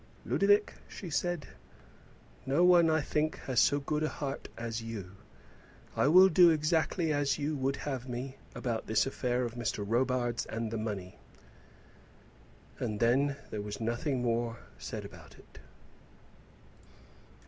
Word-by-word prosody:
"Ludovic," 205 +1 +3
she 180 -4 -8
said, 175 0 -1 1.0
"no 140 +6 +3
one, 175 -2 +6
I 160 0 +2
think, 155 +2 -1
has 130 -2 0
so 145 +2 +4
good 150 +2 -2
a 155 - +1
heart 140 -2 -5
as 115 0 -4
you. 110 -5 -6 0.8
I - - +3
will 185 +5 +8
do 175 -1 +6
exactly 160 +1 +1
as 145 -1 +1
you 150 +1 -2
would 135 +1 0
have 130 -3 -5
me 130 +2 -5 0.2
about 115 -3 -3
this 110 -1 +2
affair 125 -2 -1
of 120 -2 -3
Mr. 120 -3 -3
Robarts 120 +1 0
and 115 0 -3
the 115 - -2
money." 100 -5 -5 1.6
And 105 -1 -2
then 135 +4 +3 0.2
there 105 - -3
was 105 0 -6
nothing 120 +3 -1
more 115 -1 0 0.2
said - - -6
about - - -13
it. - - -17
130 Hz, 140 wpm, -31 LUFS, 115-155 Hz, 1.6 s, will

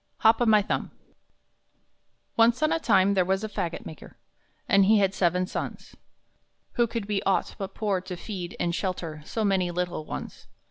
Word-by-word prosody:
HOP 225 +2 +5
O - - +4
MY 215 -2 +5
THUMB - - -2 1.5
Once 235 +4 +4
on 310 - +3
a 330 - +1
time 200 -7 +3
there 190 -2 +3
was 190 +3 0
a - - -1
fagot 170 -5 -4
maker, 160 - -11 0.5
And 195 -3 +5
he 215 +2 +5
had 195 -2 +2
seven 180 0 +1
sons. - - -6 0.8
Who 240 -2 +2
could 230 -2 -4
be 205 -1 -1
aught 195 - 0
but 195 0 -5
poor 205 -4 0
to 185 -1 -7
feed 185 -3 -6
and 170 -1 0
shelter 170 -4 -3
So 220 +4 -2
many 190 -3 +2
little 175 -2 -3
ones? - - -8
195 Hz, 180 wpm, -26 LUFS, 180-215 Hz, 1.5 s, HOP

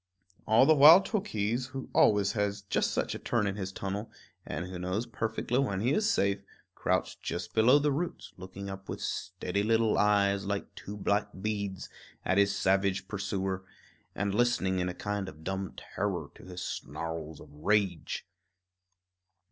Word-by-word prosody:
All 110 +4 +6
the 155 - +6
while 155 +4 +10
Tookhees, 125 - -1
who 135 -1 -5
always 100 -2 +4
has 105 -2 -1
just 100 - 0
such - - -1
a - - -5
turn 115 -3 0
in 100 -1 -1
his 95 -2 -4
tunnel, 100 +3 -4 0.4
and 85 +3 -3
who 90 -1 -7
knows 90 +6 -2
perfectly 115 +2 -1
when 100 -9 0
he 120 +7 +2
is 215 +6 +2
safe, 100 - +1 0.3
crouched - - -1
just 85 0 -4
below 120 +5 +6
the 145 0 +2
roots, 165 +5 -3
looking 95 +2 -8
up 95 0 -8
with - - -4
steady 95 +1 -2
little 110 +1 +2
eyes, 100 -1 +3
like 100 0 -3
two 105 +1 -8
black 100 +1 +1
beads, 100 -2 -3 0.4
at 95 - +3
his 100 0 +3
savage 95 0 +1
pursuer, 95 -2 -2 0.5
and 100 0 -1
listening 105 -5 +2
in 90 0 0
a 90 - -5
kind 105 -2 -3
of 80 -1 -14
dumb 95 +1 -3
terror - - -3
to - - -15
his 90 -1 -6
snarls 80 -1 -5
of 75 - -13
rage. 90 +1 0
100 Hz, 165 wpm, -30 LUFS, 95-110 Hz, 0.5 s, while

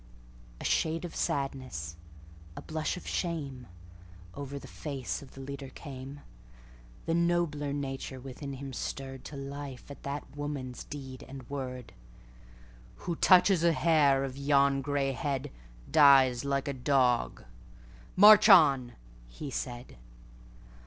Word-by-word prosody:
A - - -8
shade 165 +2 0
of 170 - -8
sadness, 130 - -3 0.6
a - - -7
blush 155 +2 -3
of - - -10
shame, 140 -8 -3 0.7
Over 140 0 -6
the - - -9
face 140 -5 -5
of 135 - -14
the 135 - -9
leader 140 0 -7
came; 135 0 -9 0.8
The 165 - 0
nobler 170 -4 +1
nature 135 -2 -4
within 135 +2 -7
him 135 0 -7
stirredTo 135 +2 -6
life 140 -2 -8
at 140 - -11
that 140 0 -6
woman's 145 -4 -5
deed 135 -2 -8
and 130 -2 -9
word:"Who - - -9
touches 185 -1 +5
a 170 -1 +4
hair 150 -4 +3
of 135 -1 -5
yon 140 -1 +3
gray 140 -1 -1
headDies 130 - +2
like 140 0 -1
a 140 - -1
dog! 125 - +1 0.7
March 210 +2 +9
on!" 140 - +6 0.3
he 135 - -8
said. 120 - -6
140 Hz, 120 wpm, -30 LUFS, 130-145 Hz, 0.8 s, March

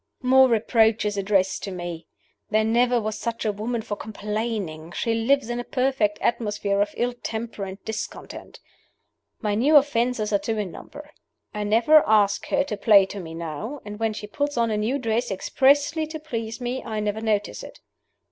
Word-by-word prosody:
"More 260 +1 +6
reproaches 220 -2 +2
addressed 195 -1 +1
to 195 - -4
me! 175 -2 -6 0.4
There 215 +1 +2
never 240 +2 +3
was 215 -1 -4
such 230 -1 -3
a 215 - +2
woman 220 +3 -3
for 210 -2 -4
complaining; 210 -7 -4
she 230 - -1
lives 230 +3 +2
in 240 0 -3
a - - -3
perfect 250 -5 0
atmosphere 210 -4 0
of 205 0 -1
ill 245 +1 0
temper 225 -3 -5
and 190 0 -7
discontent. 220 0 -7 0.8
"My 210 -3 0
new 265 +9 +3
offenses 245 -6 +3
are 200 - +4
two 225 +1 -2
in 205 -4 -3
number: 295 - -11 0.4
I 210 0 -3
never 235 +9 +5
ask 205 -2 +3
her 280 -1 +2
to 220 -7 -5
play 200 -1 +6
to 200 +1 -7
me 165 -3 -8
now; 170 - -5
and 210 0 -7
when 225 -1 0
she 210 - -6
puts 285 +6 -3
on 230 -1 +2
a 210 - 0
new 225 +6 0
dress 235 -1 -1
expressly 285 - +2
to 315 0 -6
please 230 -7 -5
me, 250 +1 -3
I 220 -1 -4
never 210 +1 -2
notice 210 -2 -1
it. - - -11
220 Hz, 185 wpm, -24 LUFS, 205-245 Hz, 0.8 s, More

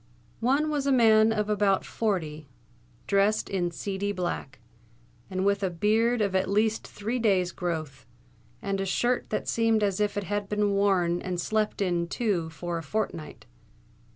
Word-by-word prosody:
One 280 +6 +2
was 285 -2 -1
a - - +3
man 225 -3 +5
of 210 -1 0
about 205 -2 +2
forty, 160 -9 -2 0.6
dressed 200 +2 +2
in 180 -3 0
seedy 200 +3 -3
black, 175 -7 -4 0.7
and 185 0 -2
with 200 0 +2
a 190 - +1
beard 220 +7 +2
of 200 -2 0
at 190 0 +1
least 215 +2 +1
three 225 +5 -3
days' 190 -6 +2
growth, 155 -8 -4 0.6
and 195 -1 -1
a - - -1
shirt 240 +6 0
that - - -2
seemed 225 -2 +2
as 200 -2 0
if 205 -1 0
it 205 - -1
had 205 +1 -3
been 210 -1 +1
worn 190 -4 +2
and 180 -1 -3
slept 215 +2 0
in 175 -2 0
too 180 -5 -1
for 170 +2 -4
a - - -8
fortnight. 165 -2 -4
200 Hz, 165 wpm, -27 LUFS, 180-215 Hz, 0.7 s, man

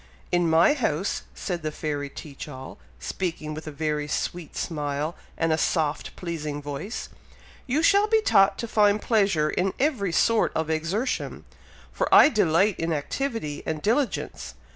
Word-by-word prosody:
"In 175 -1 +2
my 165 - +5
house," 195 - -1
said 175 -3 -3
the 155 0 -3
fairy 145 -2 -3
Teach 140 0 -9
all, 130 -2 -9 0.2
speaking 165 -4 -4
with 155 +1 -8
a - - -4
very 150 0 -2
sweet 170 +2 -3
smile, 150 0 -2 0.2
and 165 -1 +2
a 155 - 0
soft, 155 -3 0
pleasing 155 -4 -4
voice, 145 - -5 0.6
"you 285 +6 +1
shall 405 +4 +5
be 445 0 +4
taught 195 - +4
to 235 - -4
find 210 -1 +3
pleasure 195 -10 +2
in 185 +1 0
every 255 - +1
sort 230 +6 +3
of 160 0 -1
exertion, 175 +11 -2 0.5
for - - -1
I - - +9
delight 195 - +2
in 165 0 -1
activity 155 - -3
and 160 -1 -3
diligence. 235 - -1
165 Hz, 155 wpm, -25 LUFS, 150-210 Hz, 0.6 s, I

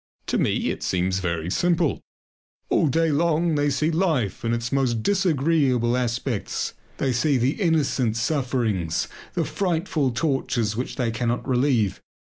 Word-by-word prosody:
To - - 0
me - - +1
it - - -6
seems 95 +1 0
very 85 -2 -2
simple. 170 - +1 0.7
All - - +3
day 165 +3 +2
long 165 +2 +2
they 145 -1 +2
see 150 +4 +1
life 160 - 0
in 115 - 0
its 115 0 -2
most 125 -5 +1
disagreeable 145 - +2
aspects. 125 -2 -2 0.2
They 130 -2 0
see 140 +3 +2
the 130 - 0
innocent 140 - +1
sufferings, 115 - 0 0.3
the - - +1
frightful 170 -6 0
tortures 120 -4 -1
which 125 +3 -3
they 120 -4 0
cannot 120 +2 -2
relieve. 125 -7 +1
130 Hz, 140 wpm, -24 LUFS, 115-155 Hz, 0.7 s, All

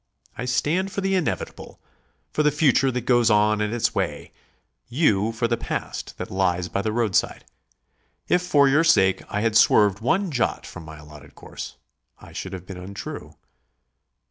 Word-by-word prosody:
I 125 - -5
stand 150 +10 0
for 200 - -3
the 195 0 0
Inevitable, 185 -4 -3 0.5
for - - 0
the 150 - +4
future 145 -2 +3
that 125 -1 -2
goes 120 -1 +3
on 105 0 +3
its 110 +2 0
way; - - -3 0.6
you 115 - +2
for 115 +1 -1
the 115 0 0
past - - -5
that - - -6
lies 90 -2 0
by 100 - -1
the 110 - -2
roadside. 110 -3 0 0.8
If 180 - +3
for 145 -6 +3
your 145 +4 +4
sake 95 - +4
I 105 - -2
had 110 -1 0
swerved 105 -3 +5
one 175 - 0
jot 125 -4 -1
from 80 - -10
my 80 0 -10
allotted 75 -1 -14
course, - - -9 0.4
I - - -15
should 95 - -6
have 90 -1 -7
been 95 -1 -8
untrue. 100 +2 -8
115 Hz, 170 wpm, -23 LUFS, 95-140 Hz, 0.8 s, swerved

